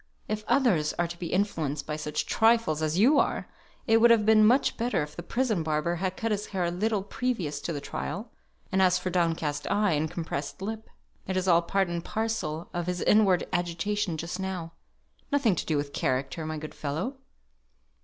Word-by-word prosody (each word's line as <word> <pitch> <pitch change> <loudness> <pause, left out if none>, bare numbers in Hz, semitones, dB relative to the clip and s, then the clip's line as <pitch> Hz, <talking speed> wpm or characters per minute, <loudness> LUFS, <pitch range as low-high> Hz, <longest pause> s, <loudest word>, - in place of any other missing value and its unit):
If 215 0 -3
others 190 - +3
are 175 - 0
to 170 0 -9
be 175 - -4
influenced 160 -8 -1
by 150 - -3
such 150 0 -3
trifles 225 -9 +3
as 155 +1 0
you 265 +9 +5
are, - - 0 0.4
it 225 0 +4
would 235 - +7
have 225 -3 +5
been 215 0 +6
much 245 +6 +4
better 235 -9 0
if 150 0 -9
the - - -5
prison 230 -1 0
barber 155 +2 0
had 185 +1 -2
cut 225 0 -1
his 210 0 -1
hair 190 -3 -2
a 170 - 0
little 205 +2 0
previous 195 - -2
to - - -3
the 150 - -3
trial; 205 +9 -5 0.4
and 190 0 +2
as 185 -1 +4
for 185 0 -3
down 170 -2 +2
cast 145 -2 -3
eye, 205 -1 +2
and 155 0 0
compressed 150 -4 -4
lip, 220 +3 -5 0.4
it 190 0 -1
is 185 0 -1
all 170 -2 +5
part 195 +2 0
and 170 -1 -3
parcel 190 -9 -3
of 175 -1 -3
his 180 -1 -2
inward 200 -4 +4
agitation 175 +1 -1
just 170 +3 -5
now; 185 -3 -4 0.6
nothing 275 -8 +3
to - - -4
do 155 - +1
with 145 0 -3
character, 135 +5 -1
my 155 0 -3
good 155 0 -7
fellow." 165 - -3
180 Hz, 205 wpm, -28 LUFS, 160-215 Hz, 0.6 s, would